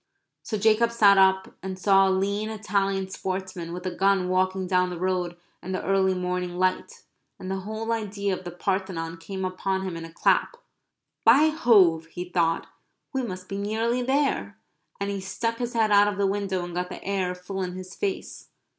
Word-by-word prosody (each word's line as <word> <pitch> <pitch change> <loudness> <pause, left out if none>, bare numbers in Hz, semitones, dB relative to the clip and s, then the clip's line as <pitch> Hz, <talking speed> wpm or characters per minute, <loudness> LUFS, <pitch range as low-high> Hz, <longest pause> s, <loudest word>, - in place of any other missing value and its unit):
So 215 - -3
Jacob 220 +2 +3
sat 205 -4 +6
up, 190 0 +3
and 190 -1 -5
saw 195 0 +4
a - - +2
lean 200 +3 0
Italian 195 -3 -1
sportsman 185 -3 -4
with 180 +1 -6
a 185 - -2
gun 195 -1 +2
walking 185 +1 +1
down 180 0 +2
the 180 - -5
road 180 -1 -1 0.2
in 185 - -5
the 185 - -2
early 190 -1 +2
morning 180 -1 -2
light, 185 0 -1 0.3
and 185 - -6
the 195 - -2
whole 220 +3 -4
idea 200 -3 -1
of 185 - -10
the 175 - -5
Parthenon 175 -2 -3
came 190 +3 -5
upon 190 +1 -2
him 185 -3 -4
in 165 - -6
a 165 - -9
clap. 475 - +1 0.7
"By 290 +7 +6
Jove!" 190 - +4
he 175 +2 -6
thought, 165 -2 +1 0.5
"we 265 - 0
must 185 -6 -6
be 195 - -4
nearly 225 +4 0
there!" 275 +3 0 0.4
and 200 0 -2
he 200 -1 -3
stuck 230 +4 -3
his 240 -1 -3
head 220 -2 +2
out 205 0 +6
of 205 -1 -2
the 200 - +2
window 195 -2 -1
and 175 - -8
got 180 +1 -2
the - - -8
air 190 -2 -1
full 190 +2 -6
in 180 -1 -3
his 185 +1 -8
face. 390 -2 -4
190 Hz, 195 wpm, -26 LUFS, 180-205 Hz, 0.7 s, sat